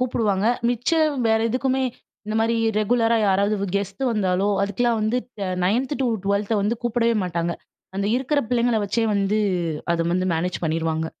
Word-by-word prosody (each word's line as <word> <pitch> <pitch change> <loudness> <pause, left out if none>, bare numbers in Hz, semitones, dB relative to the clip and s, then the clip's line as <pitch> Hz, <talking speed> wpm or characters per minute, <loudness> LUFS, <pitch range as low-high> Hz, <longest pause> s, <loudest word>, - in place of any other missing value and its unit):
கூப்பிடுவாங்க. 215 -5 0 0.2
மிச்சம், 305 +6 +1
வேற 220 - +3
எதுக்குமே 260 +2 0 0.4
இந்த 215 - -3
மாரி 230 +1 +1 0.2
ரெகுலரா 230 +2 +2
யாராவது 200 +2 +2
வு - - 0
கெஸ்ட் 200 +6 -4
வந்தாலோ 195 -3 +1
அதுக்கெல்லாம் 225 +4 0
வந்து 215 +3 0 0.3
அ - - -2 0.2
9த் 250 +9 +1
டு - - +1 0.2
12த்த 200 +2 0
வந்து 210 +4 +1
கூப்பிடவே 235 0 +1
மாட்டாங்க. 170 -1 -2 0.4
அந்த 200 +1 -1
இருக்கிற 270 +3 0
பிள்ளைங்கள 240 -1 +2
வச்சே 225 +3 0
வந்து 200 +1 +1 0.5
அத 165 0 0
வந்து 185 +1 0
மேனேஜ் 180 +3 -2
பண்ணிருவாங்க. 160 0 -1
215 Hz, 155 wpm, -23 LUFS, 190-240 Hz, 0.5 s, வேற